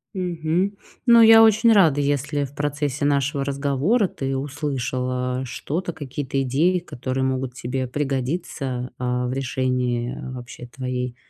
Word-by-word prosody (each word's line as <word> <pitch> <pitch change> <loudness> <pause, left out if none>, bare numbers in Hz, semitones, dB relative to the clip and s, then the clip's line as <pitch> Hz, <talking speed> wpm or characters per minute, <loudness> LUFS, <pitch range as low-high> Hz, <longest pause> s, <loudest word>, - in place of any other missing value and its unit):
Мгм. 180 +2 -1 0.3
Ну, 235 -1 +8
я 225 0 +9
очень 220 +1 +5
рада, 165 -9 +5
если 145 +1 0
в 140 0 -7
процессе 145 0 -2
нашего 140 0 +1
разговора 140 - +1
ты 135 -5 -3
услышал, 135 -2 -3
а, 125 0 -2
что-то, 170 +8 -4
какие-то 140 -2 -4
идеи, 155 +8 +2
которые 130 -5 -4
могут 130 -1 -2
тебе 130 +1 -3
пригодиться, 135 -1 -3
а, 125 0 -1
в 125 - -2
решении 125 -2 -1 0.2
вообще 125 0 -9
твоей 125 -1 -4
135 Hz, 135 wpm, -23 LUFS, 125-155 Hz, 0.3 s, я